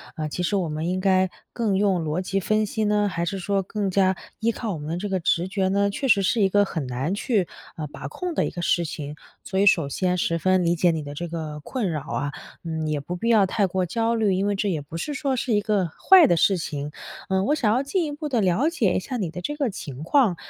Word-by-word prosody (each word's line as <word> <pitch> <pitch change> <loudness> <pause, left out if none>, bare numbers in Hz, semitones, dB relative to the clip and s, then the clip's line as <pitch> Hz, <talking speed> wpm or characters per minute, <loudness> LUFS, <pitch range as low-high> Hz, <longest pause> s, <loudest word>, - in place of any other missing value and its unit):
呃， 155 -1 -3
其 150 - -4
实 200 - 0
我 185 -4 0
们 155 +3 -2
应 185 - -1
该 185 -1 +3 0.2
更 215 -5 0
用 190 -4 +2
逻 155 +4 -1
辑 195 +1 -1
分 215 +3 +1
析 215 +1 -2
呢？ 210 0 +2
还 175 -3 -2
是 195 +3 -2
说 195 +2 0
更 200 +1 -2
加 190 0 +3 0.2
依 230 +1 +2
靠 220 -3 -4
我 - - -4
们 150 +1 -6
的 170 - -2
这 200 +4 -3
个 190 - 0
直 170 +1 +1
觉 190 0 0
呢？ 200 +1 +2
确 270 +7 -2
实 215 -5 +5
是 230 +3 +2
一 195 - +4
个 205 +1 +4
很 155 -8 -4
难 130 +8 -2
去， 205 -3 0 0.3
啊， 155 - -4
把 135 - -8
控 355 - -4
的 - - +1
一 - - -2
个 175 - -6
事 170 0 +2
情。 150 -1 -6 0.3
所 190 0 -2
以 200 - +4
首 165 -7 +4
先 180 +5 0
十 165 -1 0
分 185 +2 +3
理 170 - +3
解 175 +1 +3
你 160 -2 -3
的 145 - -7
这 175 +4 -4
个 155 -3 -5
困 220 - -2
扰 150 -3 -2
啊， 145 +1 -3 0.3
嗯， 160 -2 -3
也 150 -1 0
不 175 +6 -5
必 230 +6 -2
要 215 -4 +5
太 195 +1 +1
过 185 0 -1
焦 230 +5 0
虑， 215 -4 +2
因 190 +2 0
为 205 - +1
这 205 +1 0
也 160 -5 -1
不 150 +3 -8
是 290 - -3
说 275 -1 -1
是 245 -1 -1
一 210 - +3
个 205 -4 +1
坏 365 - +6
的 175 - +3
事 185 +4 +3
情。 150 -3 -4 0.4
呃， 190 0 +2
我 295 - +2
想 225 -7 +2
要 255 - +2
进 330 +5 0
一 300 - -4
步 295 +1 -5
地 250 -6 +1
了 195 - +2
解 225 - +1
一 - - +2
下 250 +7 -5
你 190 -8 -2
的 180 +2 -7
这 295 +11 -3
个 285 -4 0
情 145 - -7
况， 220 - +3
190 Hz, 295 characters per minute, -24 LUFS, 165-215 Hz, 0.4 s, 坏